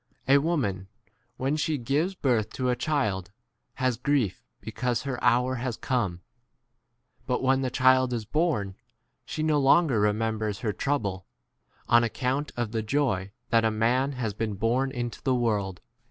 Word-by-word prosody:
A 140 +1 +6
woman, 125 - -1 0.5
when 135 +3 0
she 155 0 0
gives 145 +10 0
birth 120 - +1
to 130 -1 -1
a - - +1
child, 105 -12 -1 0.5
has 130 -2 0
grief 130 -6 0 0.2
because 125 +1 -2
her 130 -3 -4
hour 125 +2 +3
has 125 -2 -3
come; 100 -9 -1 1.1
but 125 -1 0
when 135 0 +3
the 130 - 0
child 130 0 +4
is 115 -3 -2
born, 125 - 0 0.5
she 155 - -4
no 155 -2 +2
longer 140 -4 +4
re 105 0 +4
members 110 -2 -2
[her] 110 -4 -1
trouble 100 -11 -2 0.6
r 120 - +6
on 120 - +4
account 130 +5 -1
of 120 -3 -2
the 115 -1 -1
joy 110 -5 0 0.2
that 115 0 +4
a 110 - +3
man 120 +6 +1
has 120 -5 -3
been 105 -1 -3
22 - - -20
born 125 +5 +1
into 120 -3 -4
the 130 -2 +1
world. 105 -6 -1
125 Hz, 170 wpm, -27 LUFS, 110-135 Hz, 1.1 s, A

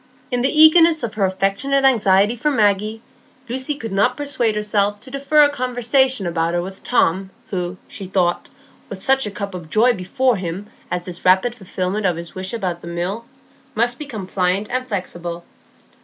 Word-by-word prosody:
In 245 -1 0
the 265 - +2
eagerness 315 0 +6
of 225 -2 -3
her 205 -2 +1
affectionate 195 +9 0
anxiety 210 -3 +4
for 250 +6 0
Maggie, 215 -2 +1 0.4
Lucy 260 +4 -2
could 230 -6 -7
not 195 +1 +1
persuade 265 -7 0
herself 205 -1 0
to 260 - -8
defer 280 +2 +3
a 290 - +5
conversation 255 -2 +1
about 170 0 -1
her 175 - +1
with 190 +1 -9
Tom, 190 -5 +1 0.2
who, 180 -1 -3
she 195 - -7
thought, 180 -2 0 0.4
with 195 - -7
such 270 +2 +3
a - - -3
cup 200 -1 -6
of 175 -3 -8
joy 235 +7 +4
before 235 +5 0
him 180 +2 -5 0.2
as 180 -1 -3
this 175 -1 -7
rapid 190 +6 +3
fulfilment 195 -2 -2
of 175 - 0
his 170 0 -7
wish 185 0 -4
about 185 -7 -3
the - - -10
Mill, 180 +7 -4 0.5
must 240 +2 +1
become 235 -10 -6
pliant 185 +3 -1
and 255 +1 -2
flexible. 175 -5 -5
205 Hz, 180 wpm, -20 LUFS, 185-250 Hz, 0.5 s, eagerness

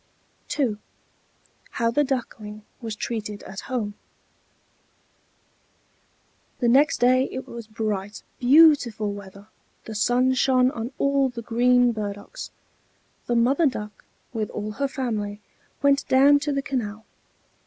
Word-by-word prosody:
II 245 -8 +1 1.0
HOW 230 -1 +1
THE 295 +5 +2
DUCKLING 220 -6 -4 0.2
WAS 225 -3 -5
TREATED 210 -2 -5
AT 190 - -8
HOME 225 -5 -2 2.6
The 245 - 0
next 275 +5 +4
day 255 +2 +3
it 260 - -6
was 235 -2 -8
bright, 210 -2 -4 0.2
beautiful 250 -6 +5
weather; 200 +1 -11 0.4
the 220 - -7
sun 245 +4 +2
shone 255 0 +3
on 230 +1 -5
all 275 -1 +2
the 235 -2 -7
green 245 +1 +3
burdocks. 210 - -6 0.8
The 240 - +1
Mother 270 +7 +3
Duck, 210 -6 -5 0.3
with 220 -2 -2
all 210 0 -5
her 280 +6 -1
family, 220 -7 -3 0.4
went 280 0 +3
down 280 +2 +6
to 290 +1 -2
the 275 -1 -1
canal. 220 -6 -4
235 Hz, 120 wpm, -24 LUFS, 210-265 Hz, 2.6 s, down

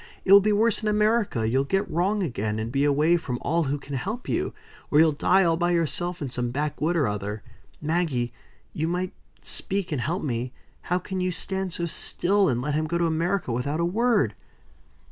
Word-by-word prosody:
It 195 - +6
will 200 - +10
be 210 +2 +2
worse 215 +1 +2
in 215 - -2
America. 210 - +2
You'll 130 +4 +2
get 195 +8 0
wrong 195 +5 0
again, 110 - -2
and 110 +1 -3
be 140 +3 +1
away 150 +4 +3
from 125 -7 -4
all 165 +2 +1
who 140 +2 -1
can 140 0 -7
help 220 - -4
you. - - -1 0.4
Or 145 - +2
you'll 160 0 +6
die 185 +6 +3
all 165 -2 +2
by 175 0 +1
yourself, 170 +1 -1
in 135 - -4
some 120 -1 -2
backwood 150 +5 -1
or 150 -7 +2
other. 105 +1 -4 0.4
Maggie! 150 -7 -1 0.4
you 160 +1 -1
might 180 +2 -2 0.3
speak 195 -2 -1
and 145 -5 -1
help 170 +9 -2
me 125 -2 -2 0.4
how 180 - +3
can 185 +1 -4
you 180 0 0
stand 190 +1 -2
so 170 - -2
still, 195 +3 +1
and 125 -1 -1
let 150 +2 -1
him 155 +1 0
go 170 - -1
to 170 - +1
America 170 0 0
without 140 +7 -1
a 170 - +2
word!" 210 - +2
165 Hz, 205 wpm, -25 LUFS, 135-185 Hz, 0.4 s, will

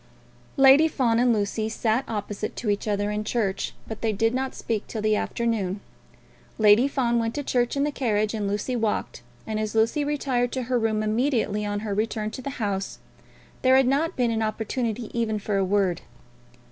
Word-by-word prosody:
Lady 275 +3 +7
Fawn 240 -7 +1
and 245 0 +4
Lucy 215 0 0
sat 225 +3 0
opposite 210 -1 -4
to 215 -4 -1
each 205 +2 -2
other 205 0 0
in 210 0 -2
church, 210 -3 -2
but 220 - -7
they 225 - +1
did 225 +3 +1
not 265 +1 -2
speak 220 -3 -3
till 225 - -5
the 215 0 +2
afternoon. 210 -4 -1 0.8
Lady 215 +4 +6
Fawn 240 -4 +1
went 225 0 -2
to 290 - -2
church 245 0 0
in 280 - +2
the 295 - 0
carriage 215 -6 0
and 210 -2 -2
Lucy 210 +5 -2
walked, 220 - -2 0.2
and 215 -1 -3
as 215 0 -3
Lucy 230 +7 +2
retired 270 -4 0
to 260 - -2
her 250 0 0
room 220 -1 0
immediately 220 -2 0
on 205 0 -2
her 210 -2 -3
return 215 +1 -1
to 260 - -7
the 275 - -4
house, 200 -4 -2 0.6
there 260 0 +5
had 265 - +4
not 290 +5 +1
been 245 -2 +1
an 225 0 -1
opportunity 225 +1 -2
even 230 -2 0
for 205 -1 -2
a 195 - +2
word. 190 -2 +1
225 Hz, 195 wpm, -25 LUFS, 210-250 Hz, 0.8 s, Lady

